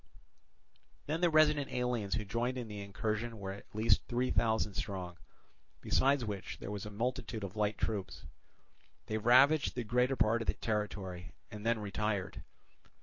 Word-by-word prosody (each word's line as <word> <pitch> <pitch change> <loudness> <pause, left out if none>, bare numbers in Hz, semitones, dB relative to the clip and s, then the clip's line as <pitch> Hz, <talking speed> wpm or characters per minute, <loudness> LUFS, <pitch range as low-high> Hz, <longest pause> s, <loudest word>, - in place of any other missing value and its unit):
Then 160 +3 -2
the 175 - +5
resident 150 -3 +4
aliens 120 -6 -1
who 105 - -2
joined 120 +6 -1
in 120 -2 -4
the 105 -1 -6
incursion 110 +3 -3
were 95 -2 -5
at 100 - -10
least 110 0 +3
three 125 +1 0
thousand 110 -2 +1
strong; 90 -4 -4 0.6
besides 135 -2 +2
which 100 -3 -5
there 100 - -6
was 105 0 -4
a - - -5
multitude 115 0 -3
of 100 0 -6
light 105 0 0
troops. 105 -4 -3 0.8
They 110 0 -2
ravaged 135 +7 +5
the 125 - -2
greater 125 +4 +2
part 115 0 +2
of 115 - -5
the - - +1
territory, 100 -4 -3 0.2
and 105 +1 -5
then 115 0 +3
retired. 105 -2 -2
110 Hz, 160 wpm, -33 LUFS, 100-125 Hz, 0.8 s, the